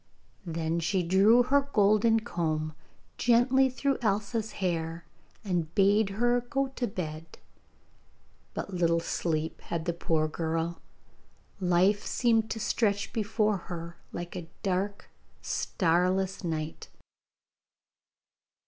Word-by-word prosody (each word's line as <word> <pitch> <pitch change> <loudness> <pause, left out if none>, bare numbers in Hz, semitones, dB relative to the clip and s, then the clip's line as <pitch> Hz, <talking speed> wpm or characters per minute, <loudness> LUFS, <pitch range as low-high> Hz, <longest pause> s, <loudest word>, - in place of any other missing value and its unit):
Then 165 0 -1
she 180 +3 0
drew 200 +8 +5
her 280 +3 +3
golden 215 +2 +4
comb 155 -7 -2 0.5
gently 250 +3 +4
through 275 +1 -1
Elsa's 215 +1 -1
hair, 165 -3 -2 0.4
and 175 -5 -2
bade 200 +1 +4
her 240 +4 +1
go 270 +3 -1
to 260 -2 -3
bed; 160 -4 -6 1.2
but 200 - -5
little 170 -2 +2
sleep 160 -1 -2
had 165 -1 -4
the 170 - 0
poor 160 -2 0
girl! 165 +1 -2 0.8
Life 185 +3 +3
seemed 225 -2 +2
to 225 - -3
stretch 205 -1 0
before 215 -1 +1
her 170 -1 -6 0.2
like 175 +1 -6
a 170 -2 -6
dark 195 +1 -1 0.4
starless 185 +3 0
night. 160 -2 -4
190 Hz, 110 wpm, -29 LUFS, 165-220 Hz, 1.2 s, drew